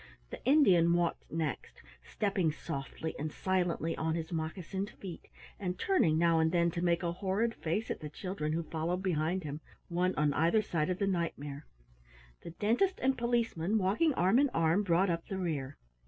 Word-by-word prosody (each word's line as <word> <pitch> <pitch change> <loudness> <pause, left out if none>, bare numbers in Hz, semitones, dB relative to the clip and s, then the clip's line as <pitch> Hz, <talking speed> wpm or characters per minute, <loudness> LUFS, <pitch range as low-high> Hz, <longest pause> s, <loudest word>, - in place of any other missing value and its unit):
The - - -8
Indian 190 - +5
walked 175 -1 -1
next, 160 -4 -4 0.2
stepping 195 -6 0
softly 145 +2 -5
and 155 +1 -3
silently 175 -3 0
on 160 0 -1
his 160 0 -4
moccasined 175 +4 -3
feet, 185 -4 -9 0.3
and 180 -2 -3
turning 185 - +2
now 165 0 +4
and 160 0 +3
then 170 -1 +2
to 170 0 -3
make 175 0 +1
a 170 - 0
horrid 200 +6 0
face 205 +6 -2
at - - -3
the 150 - -6
children 155 -2 -3
who 165 +1 -1
followed 165 +4 -2
behind 175 0 0
him, 150 +1 -5 0.3
one 180 +2 +1
on 150 -1 +2
either 170 +9 +3
side 160 -4 -1
of 180 - 0
the 200 - 0
Knight 175 -4 -1
mare. 145 +1 -8 0.7
The - - -8
Dentist 230 - +1
and 265 +1 +2
Policeman, 230 -6 0
walking 210 - +2
arm 190 +8 +4
in 285 0 +4
arm, 165 +4 +3
brought 185 -1 +2
up 165 0 -3
the 195 - -4
rear. 145 -7 -3
170 Hz, 185 wpm, -32 LUFS, 160-195 Hz, 0.7 s, Indian